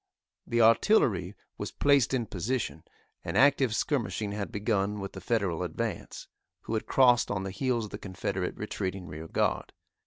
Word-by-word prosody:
The 120 0 +2
artillery 110 - +3 0.2
was - - -3
placed 140 -4 +3
in 125 -3 0
position, 105 -2 -3 0.4
and - - -2
active 135 -3 +4
skirmishing 110 - -1
had 100 -1 -4
begun 105 -1 0
with 95 0 -5
the 95 - -8
Federal 95 -5 0
advance, 85 -3 -4 0.3
who - - -5
had 110 - -2
crossed 125 -3 +4
on 100 -2 -2
the 95 - -4
heels 120 +2 -1
of 105 - -11
the 105 - -6
Confederate 95 -2 -3
retreating 95 -3 -4
rear 80 0 -8
guard. - - -1
105 Hz, 160 wpm, -29 LUFS, 95-120 Hz, 0.4 s, active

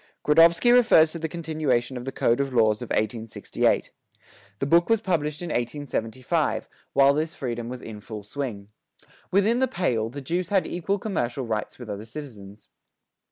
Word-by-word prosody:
Gradovsky 165 +9 +6
refers 220 -11 +6
to 170 - -5
the 160 0 -3
continuation 155 -7 -1
of 125 0 -6
the 135 - -3
"Code 120 -1 +1
of 140 -1 -1
Laws," 110 -3 +3
of 120 - -6
1868. 110 +1 -1 0.7
The 135 - -2
book 170 +6 +4
was 225 -1 +4
published 155 -5 -1
in 175 - -4
1875, 120 -2 -2 0.3
while 140 0 +5
this 155 +4 -2
freedom 120 -5 -4
was 125 0 -7
in 105 -2 -8
full 105 0 -8
swing. 105 -3 -5 0.6
Within 210 +5 +3
the 260 - +3
"Pale," 115 - -1
the 140 +4 -7
Jews 170 +6 -2
had 195 -2 +2
equal 185 +3 -2
commercial 135 - -2
rights 110 -2 -3
with 120 - -9
other 105 0 -6
citizens. 110 -6 -10
135 Hz, 165 wpm, -25 LUFS, 115-165 Hz, 0.7 s, Gradovsky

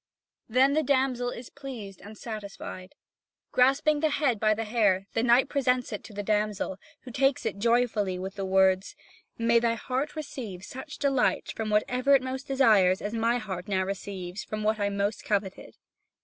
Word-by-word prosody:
Then 260 +4 +4
the 310 - +3
damsel 260 -3 +1
is 245 0 -8
pleased 240 -9 -8
and 210 +3 -11
satisfied. 200 -4 -8 0.6
Grasping 275 +4 +3
the 315 +1 +2
head 280 -6 +1
by 215 0 +3
the 225 - -2
hair, 210 -4 +2
the 225 - +1
knight 245 +3 +4
presents 255 -4 0
it 210 - -5
to - - -11
the 205 0 -4
damsel, 210 -2 -1 0.2
who 255 - -10
takes 270 +2 +1
it 200 - -2
joyfully 225 -4 +1
with 190 +1 -5
the 195 -1 -5
words: 190 0 +2 0.4
"May 235 0 +3
thy 230 0 +1
heart 260 +6 -3
receive 240 - -6
such 265 +6 -8
delight 275 -3 +1
from 220 -1 -3
whatever 250 +6 +3
it 265 - +2
most 260 +2 -5
desires 215 -9 +4
as 210 - -4
my 230 +1 +1
heart 190 -5 -6
now 190 -2 +1
receives 190 0 -5
from 215 0 -5
what 215 0 +1
I 200 0 +1
most 200 +1 -2
coveted. 200 -2 -3
225 Hz, 175 wpm, -27 LUFS, 200-255 Hz, 0.6 s, Then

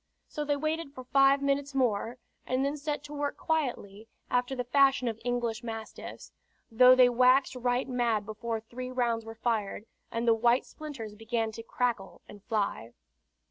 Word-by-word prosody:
So 300 - -4
they 290 0 0
waited 310 -1 -3
for 255 - -8
five 275 +2 +4
minutes 280 0 0
more, 240 -2 0 0.3
and 255 +2 +1
then 280 +1 -1
set 295 -1 -3
to 295 0 -9
work 290 -1 -2
quietly, 240 -9 -2 0.2
after 250 +2 +1
the 250 - -2
fashion 270 0 +3
of 225 -1 -3
English 240 -2 -1
mastiffs, 225 -1 -8 0.4
though 250 +3 +7
they 255 -1 +7
waxed 255 +2 +4
right 250 +1 0
mad 235 -5 0
before 225 +2 -4
three 250 +3 -7
rounds 235 -3 -1
were 225 0 -8
fired, 220 -3 -2 0.3
and 230 +1 -2
the 230 - +6
white 235 +3 +3
splinters 275 -9 -8
began 225 +1 -2
to 225 - -8
crackle 230 -4 -2
and 205 -1 -13
fly. 200 - -2
245 Hz, 170 wpm, -29 LUFS, 225-275 Hz, 0.4 s, though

